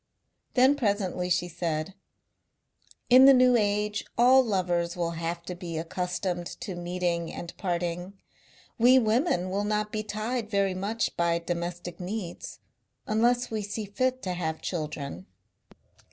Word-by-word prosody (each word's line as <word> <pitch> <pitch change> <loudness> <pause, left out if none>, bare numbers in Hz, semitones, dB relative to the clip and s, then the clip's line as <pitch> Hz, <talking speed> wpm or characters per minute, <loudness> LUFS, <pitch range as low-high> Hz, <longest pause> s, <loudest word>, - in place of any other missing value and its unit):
Then 260 +2 +5
presently 200 -7 -1
she 175 0 +1
said: 165 0 -3 1.2
"In 255 +2 +9
the 275 0 +9
New 250 0 +5
Age 210 -1 +1
all 255 +2 +6
lovers 175 -5 0
will 170 -1 -1
have 170 +1 -4
to 180 - -5
be 175 -2 -6
accustomed 180 +1 -3
to 215 -7 -4
meeting 175 -1 -2
and 170 - -7
parting. 175 0 -2 0.7
We 250 +3 +7
women 220 - +1
will 200 +2 0
not 210 0 -1
be 215 - -2
tied 215 +2 -3
very 200 -2 +1
much 205 +5 -2
by 170 0 +2
domestic 175 0 -4
needs. 180 -1 -5 0.5
Unless 240 +3 +1
we 220 -1 -1
see 205 +1 -4
fit 255 +5 -1
to 185 - -2
have 160 -3 -3
children. 155 +1 -4
185 Hz, 140 wpm, -27 LUFS, 175-220 Hz, 1.2 s, In